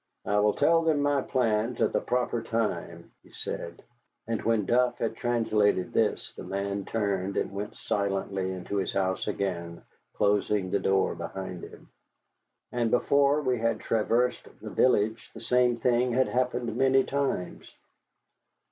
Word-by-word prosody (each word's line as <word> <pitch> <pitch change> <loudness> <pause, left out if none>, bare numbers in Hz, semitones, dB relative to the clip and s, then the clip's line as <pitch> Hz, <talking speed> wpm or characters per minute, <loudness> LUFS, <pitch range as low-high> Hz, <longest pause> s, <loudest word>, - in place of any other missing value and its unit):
"I 105 - +2
will 105 0 +3
tell 165 0 +4
them 160 -3 +2
my 145 -1 +2
plans 115 -2 0
at - - +2
the - - +1
proper 125 -1 -1
time," 115 -1 -3
he - - -21
said 85 0 -5 0.4
and 115 -1 -2
when 110 -3 +1
Duff 120 +2 +2
had 115 -1 -2
translated 110 -6 +1
this - - 0
the - - -8
man 100 0 -3
turned 100 -3 -1
and - - -1
went 100 +1 -5
silently 95 -1 -2
into 95 +2 -4
his 95 - -1
house 95 -1 -1
again, 85 -3 -3 0.3
closing 100 -2 +1
the 100 - +2
door 95 0 +2
behind 95 -2 -6
him. - - -14 0.8
And 120 -2 0
before 140 +4 +3
we 125 -3 0
had 115 -1 0
traversed 120 +2 0
the - - -8
village 110 -3 +2
the - - -8
same 125 0 +2
thing 125 +1 +2
had 130 +2 +2
happened 125 -1 -1
many 135 0 +4
times. 140 -11 -3
115 Hz, 150 wpm, -28 LUFS, 100-125 Hz, 0.8 s, tell